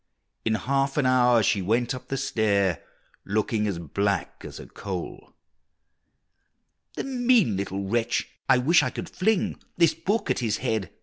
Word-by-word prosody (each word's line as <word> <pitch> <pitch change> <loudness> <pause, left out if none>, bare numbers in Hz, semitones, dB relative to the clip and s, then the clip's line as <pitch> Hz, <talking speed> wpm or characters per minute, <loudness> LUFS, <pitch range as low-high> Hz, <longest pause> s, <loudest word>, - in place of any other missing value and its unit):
In 110 -1 +1
half 135 +6 0
an 145 - +2
hour 125 -3 +4
she 100 0 +2
went 115 +6 0
up 130 - -8
the 135 - -2
stair, 100 - +1 0.4
Looking 105 +1 0
as 100 -4 -2
black 95 +4 -2
as - - -9
a - - -9
coal! 95 -3 -7 1.6
"The - - -3
mean 245 - +2
little 100 0 -3
wretch, 115 +4 0 0.2
I - - +6
wish 150 +8 +4
I - - 0
could - - -6
fling 210 +1 0 0.2
This 170 -2 +4
book 215 +4 -1
at - - 0
his 110 -4 0
head!" 110 -5 -2
115 Hz, 160 wpm, -25 LUFS, 100-135 Hz, 1.6 s, I